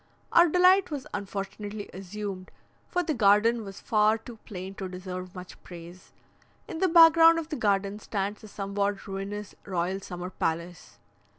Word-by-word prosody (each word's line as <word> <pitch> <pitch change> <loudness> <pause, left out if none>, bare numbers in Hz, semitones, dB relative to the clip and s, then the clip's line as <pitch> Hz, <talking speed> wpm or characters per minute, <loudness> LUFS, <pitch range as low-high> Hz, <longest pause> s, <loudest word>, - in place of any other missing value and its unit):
Our 345 0 +6
delight 365 +3 +5
was 285 -4 -5
unfortunately 205 +1 -5
assumed, 195 0 -6 0.4
for 355 -1 -1
the 320 -2 -1
garden 220 0 +3
was 195 -1 -9
far 215 0 +2
too 225 +1 -12
plain 190 -1 -7
to 190 - -4
deserve 185 0 -7
much 180 0 -11
praise. 175 +1 -12 0.6
In 320 - -6
the 380 - +3
back 330 -2 +8
ground 330 0 +7
of 325 -1 -4
the 305 - -3
garden 200 -3 0
stands 205 0 -4
a - - -9
somewhat 200 0 -3
ruinous 200 +1 -6
royal 185 0 -2
summer 180 -1 -7
palace. 170 - -4
200 Hz, 160 wpm, -27 LUFS, 185-230 Hz, 0.6 s, back